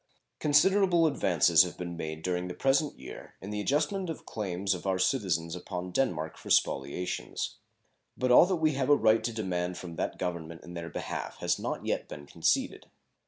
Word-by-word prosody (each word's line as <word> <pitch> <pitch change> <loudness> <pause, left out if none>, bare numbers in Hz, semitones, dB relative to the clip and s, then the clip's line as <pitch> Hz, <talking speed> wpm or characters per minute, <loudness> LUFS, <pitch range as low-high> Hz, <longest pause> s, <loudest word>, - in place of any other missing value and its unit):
Considerable 175 +3 +4
advances 90 - +4
have 90 -1 -1
been 85 -1 -5
made 80 -1 -5
during 90 0 -1
the 90 - -6
present 135 +2 +1
year 65 - -10
in 100 - -7
the 105 0 -2
adjustment 155 - 0
of 160 - -6
claims 95 -2 -2
of 90 +1 -6
our 95 -1 +1
citizens 90 - 0
upon 90 0 -6
Denmark 85 -9 -1
for - - -11
spoliations, 70 +7 0 0.6
but 130 0 +1
all 125 - +8
that 190 - +1
we 160 -2 +2
have 135 0 -1
a 145 - +8
right 110 -4 +3
to 120 - -1
demand 90 -5 -2
from 85 -2 -8
that - - -2
Government 85 -2 -5
in 85 - -10
their 85 -1 -6
behalf - - -5
has - - 0
not - - -4
yet - - -1
been 70 - -9
conceded. - - 0
95 Hz, 185 wpm, -29 LUFS, 85-135 Hz, 0.6 s, all